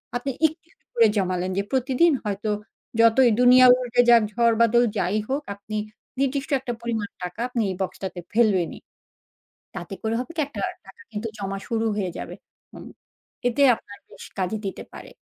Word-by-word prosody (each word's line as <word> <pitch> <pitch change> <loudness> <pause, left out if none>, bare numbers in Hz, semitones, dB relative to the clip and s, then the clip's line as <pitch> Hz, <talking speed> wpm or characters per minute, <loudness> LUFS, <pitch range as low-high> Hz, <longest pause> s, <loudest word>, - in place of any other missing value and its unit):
আপনি 255 +3 -2 0.2
একটু, 320 +2 -13
একটু - - -44
করে 230 -1 +5
জমালেন 185 -1 -1
যে 200 - +1
প্রতিদিন 265 +5 +3
হয়তো 210 0 -3 0.5
যতই 230 +2 +6
দুনিয়া 250 +1 +7
উল্টে 245 -1 +2
যাক 235 -1 +7
ঝড় 235 0 +3
বাদল 235 +1 +4
যাই 190 +2 0
হোক, 275 +3 -1
আপনি 205 +2 -8 0.4
নির্দিষ্ট 275 0 -1
একটা 255 -2 -4
পরিমাণ 225 -3 -3
টাকা 180 +3 -6
আপনি 245 -2 -2
এই 190 - -3
বক্সটাতে 190 -1 -4
ফেলবেনই। 210 -7 +2 1.0
তাতে 175 +2 -6
করে 220 0 -1
হবে 255 - -6
কি? - - 0
একটা 240 -8 -8 0.3
টাকা 195 - -16
কিন্তু 215 +2 -4
জমা 195 -1 -4
শুরু 225 -1 0
হয়ে 190 -3 -1
যাবে। - - -6 0.4
উ - - -9 0.7
এতে 245 +4 0
আপনার 205 -1 -14
বেশ - - -12
কাজে 185 +3 -1
দিতে 195 - -5
পারে। - - -11
225 Hz, 170 wpm, -24 LUFS, 195-250 Hz, 1.0 s, দুনিয়া